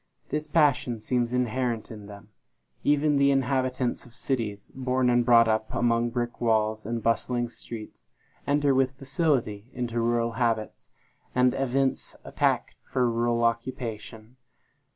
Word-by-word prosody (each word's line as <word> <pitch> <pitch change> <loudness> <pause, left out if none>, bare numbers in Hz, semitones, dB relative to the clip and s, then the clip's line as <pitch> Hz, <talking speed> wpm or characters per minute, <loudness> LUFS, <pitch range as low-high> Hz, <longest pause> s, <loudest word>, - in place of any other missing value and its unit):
This 150 0 -2
passion 145 -7 +2
seems 120 +2 -1
inherent 125 -2 -1
in 105 -2 -9
them. 100 0 -12 0.5
Even 145 0 +3
the 140 0 +4
inhabitants 130 -2 0
of 120 -1 -17
cities, 115 -6 -3
born 130 -1 +1
and 120 0 +3
brought 115 -1 +6
up 110 0 0
among 120 0 +2
brick 120 0 -3
walls 110 -2 +1
and 115 -1 -3
bustling 120 +1 0
streets, 115 -2 -10 0.4
enter 145 -1 +3
with 130 0 +1
facility 130 - -1
into 120 -2 -2
rural 115 0 +1
habits, 110 - -2 0.5
and 125 0 +4
evince 135 0 0
a - - -10
tact - - +1 0.2
for 125 -2 +2
rural 120 0 +1
occupation. 115 -1 -3
120 Hz, 135 wpm, -27 LUFS, 115-130 Hz, 0.5 s, brought